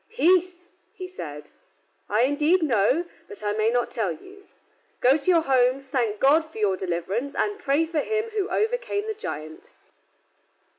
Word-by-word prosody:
"Peace," 360 -4 +2 0.3
he 370 - -7
said, 150 - -8 0.6
"I 215 +4 +3
indeed 300 +6 +2
know, 260 - +2 0.2
but 420 -3 -10
I 205 - 0
may 215 +1 +1
not 245 +1 0
tell 210 -6 -1
you. 390 - -12 0.5
Go 255 +2 +5
to 310 +3 -1
your 340 -2 +5
homes, 265 -1 +1
thank 230 -6 -1
God 295 +4 +5
for 315 -4 -14
your 205 -3 +1
deliverance, 190 +9 -3
and 415 0 -1
pray 290 -1 +1
for 320 -1 -2
him 435 +7 -2
who 420 -2 -2
overcame 445 -2 -1
the 440 - -3
giant." 155 - -8
285 Hz, 160 wpm, -25 LUFS, 220-370 Hz, 0.6 s, Go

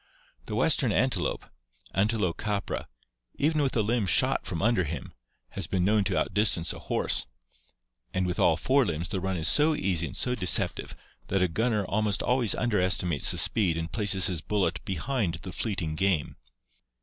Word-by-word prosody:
The - - -4
western 135 -7 +2
antelope, 115 -6 0 0.5
Antilocapra, 100 0 -1 0.5
even 155 +1 +1
with 135 -2 -1
a 110 - +2
limb 110 -1 0
shot 80 - +2
from 90 -4 -4
under 110 -1 +2
him, 80 -3 -6 0.4
has - - -4
been 90 -2 0
known 105 +1 +3
to 95 -1 0
outdistance 100 -5 +2
a - - -10
horse, - - 0 0.8
and 95 +6 -1
with 90 -1 -3
all 80 - +4
four 135 +6 +2
limbs 85 -4 -3
the 95 - -2
run 95 0 -2
is 80 - 0
so 155 +1 +3
easy 90 - 0
and 70 - -7
so 125 - 0
deceptive 90 -7 0 0.3
that 95 -1 +1
a - - +3
gunner 105 +4 0
almost 105 +1 0
always 125 -3 +2
underestimates 90 - +1
the - - 0
speed 90 -7 +2
and 80 0 -4
places 100 -4 +3
his 90 -5 0
bullet 90 -6 -1
behind 95 - -2
the 95 - -6
fleeting 90 -7 -3
game. 90 -2 0
95 Hz, 170 wpm, -27 LUFS, 85-110 Hz, 0.8 s, all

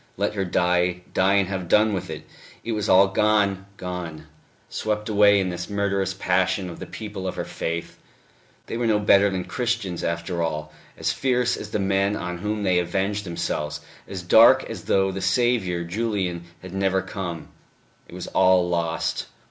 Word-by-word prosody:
Let 100 +2 0
her 100 -2 -1
die, 90 0 +1
die 95 +1 +3
and 100 -2 +3
have 95 -2 -4
done 105 +4 +4
with 95 - -3
it! - - -7 0.4
It 115 - -3
was 105 -3 -2
all 95 +1 +7
gone, 100 -1 +1
gone, 90 -4 -6 0.4
swept 105 0 -3
away 100 -1 +5
in 95 -1 0
this 90 0 -5
murderous 100 -2 -1
passion 95 0 0
of - - -10
the - - -7
people 105 -4 -6
of 90 - -3
her - - -3
faith... 85 +1 -4 0.7
they - - -4
were 120 -1 0
no 110 -2 +3
better 100 -1 +5
than 95 -2 -2
Christians, 115 -8 -2
after 85 +1 -2
all, 75 -2 -3 0.2
as - - 0
fierce 125 -2 +1
as - - -7
the - - -1
men 100 +1 +1
on 90 -2 -4
whom 105 +2 -2
they 90 -2 +3
avenged 100 +3 -1
themselves, 75 -3 -3 0.3
as 95 -2 -6
dark 110 +6 +7
as - - -8
though 95 0 +2
the 95 0 -5
Saviour, 95 -3 +1
Julian, 95 -2 -2 0.2
had 95 0 -9
never 95 -1 +1
come; 90 -4 -6 0.6
it - - -12
was 90 - -6
all 95 -1 +3
lost 85 -2 -1
95 Hz, 180 wpm, -24 LUFS, 90-105 Hz, 0.7 s, all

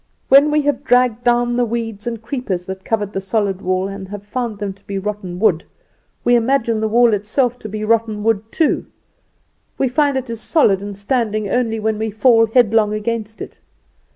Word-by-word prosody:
When 280 +2 +7
we 300 0 +2
have 290 -2 -1
dragged 245 -1 +2
down 240 0 +2
the 245 - +3
weeds 225 -2 -4
and 230 -1 -3
creepers 220 -8 -3
that 190 0 -7
covered 210 -2 -2
the 195 - -2
solid 195 -1 -1
wall 185 0 0
and 195 -1 -7
have 205 +1 -8
found 235 -1 -3
them 200 -1 -4
to 200 +1 -27
be 200 - -3
rotten 195 -3 -4
wood, 185 -5 +2 0.6
we 245 - +3
imagine 235 -1 +2
the 220 - 0
wall 235 +1 +4
itself 230 +5 0
to 215 - -8
be 215 +1 -5
rotten 220 -1 0
wood 225 0 0
too. 320 - 0 0.9
We 270 - +1
find 280 +2 +1
it 260 0 -4
is 230 -1 -5
solid 215 - +2
and 200 -1 -7
standing 215 -1 -1
only 230 -3 0
when 215 0 -1
we 220 0 -1
fall 225 +1 +4
headlong 220 -2 +3
against 220 0 -4
it. - - -12
220 Hz, 195 wpm, -18 LUFS, 205-240 Hz, 0.9 s, When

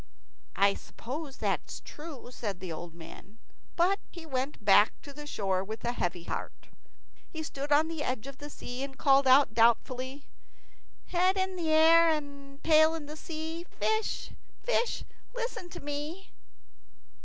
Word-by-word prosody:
"I 200 0 +5
suppose 270 +7 -7
that - - 0
is - - -7
true," 295 -5 -9
says 210 -5 -4
the 180 -2 -6
old 170 +1 -7
man; 175 +5 -12 0.4
but 370 +4 +3
he 340 -2 -10
went 265 -5 -3
back 205 +1 +6
to 285 - -10
the 295 +1 -9
shore 190 -7 0
with 220 +4 -6
a 240 - +1
heavy 175 -7 -2
heart. - - -6 0.6
He 320 -2 -5
stood 285 -1 -5
on 300 +2 +5
the 325 -2 -4
edge 255 -5 -2
of 275 -1 -9
the 290 - -7
sea 250 -3 -6
and 270 -1 -5
called 275 -1 +5
out, 260 -2 +6
doubtfully, 255 +4 +2 0.8
"Head 370 +2 +3
in 375 -1 -1
air 325 +1 +6
and 280 -2 -4
tail 315 0 +6
in 300 -1 -7
sea, 320 +2 -5
Fish, 440 0 -1 0.3
fish, - - +1 0.3
listen 470 -7 -4
to - - -8
me." 295 +6 -5
285 Hz, 155 wpm, -30 LUFS, 245-325 Hz, 0.8 s, back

